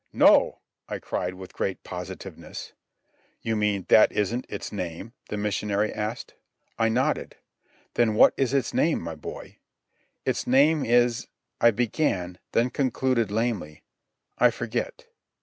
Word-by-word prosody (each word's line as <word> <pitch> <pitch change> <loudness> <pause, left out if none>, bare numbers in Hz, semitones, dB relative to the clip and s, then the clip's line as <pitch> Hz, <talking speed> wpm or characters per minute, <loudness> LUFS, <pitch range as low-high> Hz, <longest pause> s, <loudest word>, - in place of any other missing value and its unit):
"No!" - - +5 0.3
I - - -3
cried 90 +1 -3
with 95 0 -10
great 95 - -3
positiveness. 90 -1 -8 0.7
"You 115 - 0
mean 105 -3 0
that 110 - +7
isn't 115 +5 -1
its - - -5
name?" 90 +3 -5 0.2
the 105 - -3
missionary 105 0 0
asked. 105 +1 -4 0.5
I 115 0 +3
nodded. 130 +7 0 0.6
"Then 115 -3 +2
what - - +7
is 135 -2 0
its 135 -2 0
name, 165 - +2
my 85 -1 -5
boy?" 75 - -9 0.7
"It's - - -1
name 145 +4 +4
is.. 120 0 +2 0.2
." - - -51
I 115 - +7
began, 100 - -1
then 120 +2 +2
concluded 130 -3 +1
lamely, 105 -8 -2 0.6
"I, - - +7
forget." - - -4
110 Hz, 135 wpm, -26 LUFS, 100-120 Hz, 0.7 s, that